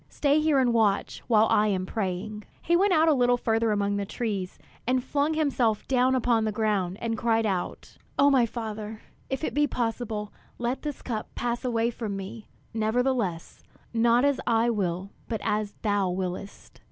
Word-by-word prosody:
Stay 290 +1 +2
here 305 -2 +3
and 250 -3 +3
watch 215 -4 +1
while 220 -2 +5
I 210 +1 +4
am 190 -3 0
praying." 205 +1 -3 0.2
He 340 - +3
went 390 +3 +3
a 320 -2 +5
little 245 -2 +3
further 225 -1 +1
among 205 -1 0
the 200 - -1
trees, 200 -5 -3 0.3
and 255 0 +2
flung 290 +3 0
himself 255 -8 +1
down 260 0 +3
upon 235 -3 +2
the 215 - 0
ground, 205 -4 0
and 230 -1 -1
cried 225 -1 +2
out: 190 -4 -3 0.2
"O 280 +1 +5
my 250 -4 +4
Father, 220 -1 -6 0.3
if 265 +3 -3
it - - -1
be 295 +1 +3
possible, 225 -4 -3 0.2
let 240 +2 -2
this 295 -2 -5
cup 220 -4 -3
pass 240 +1 -2
away 235 -2 +1
from 220 -4 -4
me; 195 +3 -8 0.3
nevertheless, 220 -5 -1 0.3
not 235 +3 +4
as 285 -1 +2
I 230 0 +3
will, 190 -2 -2 0.2
but 225 -2 -2
as 210 -1 -1
thou 205 -3 +1
willest!" 185 +2 -5
225 Hz, 175 wpm, -27 LUFS, 210-250 Hz, 0.3 s, while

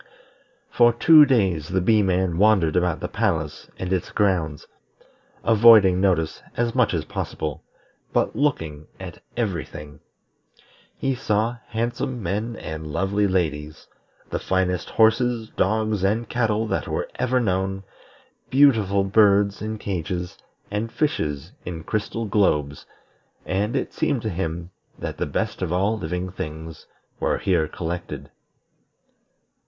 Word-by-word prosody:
For 120 -1 +5
two 155 +5 +7
days 95 - +1
the 95 +2 0
Bee 105 +4 +3
man 90 -3 0
wandered 95 -7 +4
about 90 -2 +1
the - - -2
palace - - -2
and 95 0 -2
its 90 - -1
grounds, 90 -8 0 0.8
avoiding 110 -5 +6
notice 85 -5 +1 0.2
as 120 -1 0
much 125 -7 +2
as 80 -2 -2
possible, 75 -1 -4 0.5
but - - 0
looking 80 - -1
at - - -9 0.2
every 100 -9 -1
thing. 75 -1 -11 1.0
He 135 - 0
saw 115 -2 0
handsome 120 +1 -3
men 105 +6 -2
and 80 -3 -6
lovely 100 +5 +1
ladies; 80 -5 -2 0.5
the - - -1
finest 90 -1 -1
horses, 115 0 +2
dogs, 110 0 0
and 110 +4 +1
cattle 110 -2 0
that - - -2
were - - -2
ever 130 0 +2
known; 95 -3 -1 0.7
beautiful 110 -8 +4
birds 100 0 +3
in 110 +1 -3
cages, 90 -2 -4 0.4
and 110 +2 -2
fishes 75 - -2
in 85 -2 -6
crystal 110 +5 -3
globes, 75 -9 0 0.6
and 100 +4 -1
it - - -2
seemed 135 -6 0
to 110 - -2
him 85 0 -4 0.3
that - - -5
the - - -2
best - - -2
of 90 -3 -2
all 95 +5 +1
living 90 -1 -4
things 80 -2 -7 0.3
were - - +1
here 85 -5 +1
collected. 85 +2 -6
95 Hz, 130 wpm, -23 LUFS, 85-110 Hz, 1.0 s, two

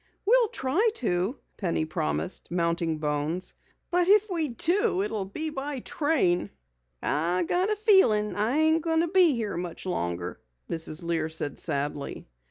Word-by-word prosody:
"We'll 475 +2 +5
try 360 - +1
to," 185 - 0 0.2
Penny 170 -5 -1
promised, 75 - -3
mounting 170 -2 0
Bones. 150 +4 -2 0.4
"But 355 0 +3
if 415 +1 +4
we 330 -4 0
do 290 - +1
it 210 - -3
will 210 -3 -2
be 310 +11 -4
by 275 -1 -4
train." 235 - +1 0.5
"I 170 +5 +1
got 360 - +1
a 425 - +2
feeling 380 - +4
I 220 +7 +1
ain't 315 +1 +3
goin' 325 0 +1
to 340 - +1
be 355 -5 +5
here 215 -6 -3
much 175 0 -6
longer," 85 - -3 0.3
Mrs. 160 -1 -2
Lear 165 -2 -1
said 155 -3 -3
sadly. 145 -2 -3
205 Hz, 155 wpm, -27 LUFS, -, 0.5 s, We'll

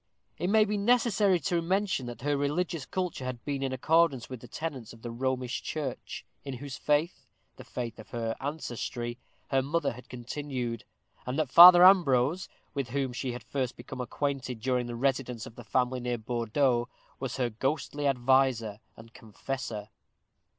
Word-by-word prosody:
It 180 - 0
may 215 +1 +5
be 210 0 -1
necessary 210 -4 +3
to 170 +6 0
mention 185 -6 0
that 120 0 -8
her 145 0 +1
religious 150 +1 -1
culture 180 -7 -3
had 130 -2 -5
been 140 -2 -2
in 135 -1 -1
accordance 145 0 +2
with 125 -3 -6
the 125 - -11
tenets 135 -4 -5
of 115 - -16
the 120 - -5
Romish 130 +1 -2
Church, 145 -5 -5 0.2
in 135 -2 -5
whose 135 +1 -7
faith 150 +4 0 0.3
the - - -10
faith 115 -2 -5
of 110 - -11
her 115 -1 -2
ancestry 120 -4 -4 0.3
her 135 -1 +3
mother 145 +2 0
had 125 +2 -12
continued; 125 -1 -4 0.4
and 125 +2 -2
that 155 -5 0
Father 175 +2 +11
Ambrose, 170 -3 +4 0.2
with 140 -4 -3
whom 135 0 -1
she 130 -1 -3
had 125 - -7
first 130 -3 -2
become 125 +1 -7
acquainted 130 -1 -3
during 125 0 0
the 120 - -5
residence 125 -2 -1
of - - -10
the 120 - -11
family 125 +2 0
near 125 0 -2
Bordeaux, 120 +2 0 0.3
was 130 -1 -4
her 125 -3 0
ghostly 145 +4 -1
adviser 125 -5 +2 0.2
and 115 0 -14
confessor. 110 -1 -6
130 Hz, 170 wpm, -29 LUFS, 120-150 Hz, 0.4 s, Father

